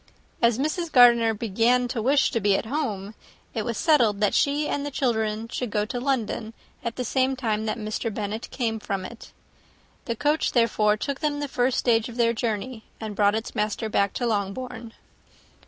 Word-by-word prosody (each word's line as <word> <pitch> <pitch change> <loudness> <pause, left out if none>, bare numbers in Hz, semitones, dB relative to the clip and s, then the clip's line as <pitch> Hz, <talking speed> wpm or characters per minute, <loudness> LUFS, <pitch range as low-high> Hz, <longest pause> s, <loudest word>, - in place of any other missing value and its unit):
As 235 -1 +4
Mrs. 310 +4 -2
Gardiner 235 -3 +6
began 230 +4 +2
to 235 - -2
wish 275 +5 +3
to 230 - 0
be 200 -2 +3
at - - -4
home, 220 -7 -3 0.4
it 220 - -2
was 235 0 -3
settled 235 -11 +3
that 210 -1 +2
she 290 +1 +2
and 285 - -2
her 290 - -3
children 220 -5 -1
should 245 +1 -4
go 210 0 0
to 245 +3 -4
London 235 -4 -2 0.3
at 235 -1 -3
the 250 - -3
same 260 +3 +1
time 220 -4 -1
that 215 - -1
Mr. 215 +1 -3
Bennet 215 +2 -4
came 225 -4 -2
from 195 -3 -3
it. 235 +4 -11 0.7
The 235 - -2
coach, 295 +6 +1
therefore, 215 -3 +3
took 275 +5 -3
them 295 -2 -1
the 290 - -2
first 250 -1 0
stage 230 -1 +2
of 235 - -9
their 230 -1 +3
journey, 220 +1 -3 0.2
and 215 -2 -5
brought 205 0 +3
its 225 +1 -4
master 215 +1 -1
back 200 -2 +1
to 245 - -1
Longbourn. 225 +2 -3
230 Hz, 190 wpm, -25 LUFS, 215-255 Hz, 0.7 s, Gardiner